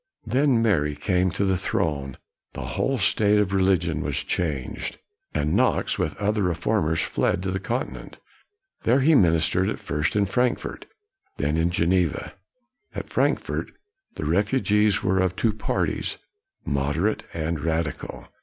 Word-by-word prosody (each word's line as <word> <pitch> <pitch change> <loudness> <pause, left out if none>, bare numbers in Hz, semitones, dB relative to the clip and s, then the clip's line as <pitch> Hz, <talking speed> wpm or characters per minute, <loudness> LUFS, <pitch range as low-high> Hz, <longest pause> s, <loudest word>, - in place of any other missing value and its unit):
Then 130 -3 +2
Mary 75 -9 +2
came 90 +4 +1
to 100 +3 -1
the 95 -1 +2
throne, 75 - -2 0.4
the - - -6
whole 135 0 0
state 105 0 +3
of 100 -2 +1
religion 90 -5 +2
was 70 -1 -1
changed, 75 -8 -3 0.3
and 75 +1 0
Knox, - - +2
with - - -1
other 105 +1 0
re 90 -3 +1
formers, 80 -2 0
fled 90 - 0
to 95 - -1
the 95 - -2
continent. 115 +7 -4 0.6
There 125 +4 +3
he 160 +5 +5
ministered, 90 - +3
at - - -3
first 75 +4 -2
in 105 -1 +3
Frankfort, 125 +5 -1 0.5
then 75 +1 0
in 80 +1 +2
Geneva. 85 -2 0 0.6
At - - -5
Frankfort, - - 0 0.5
the - - -4
refugees 105 - +2
were 95 0 +2
of 95 -1 +1
two 110 +2 +1
parties, 110 - -1 0.5
moderate 75 +8 0
and 80 0 -2
radical. 80 0 -3
95 Hz, 145 wpm, -24 LUFS, 80-105 Hz, 0.6 s, he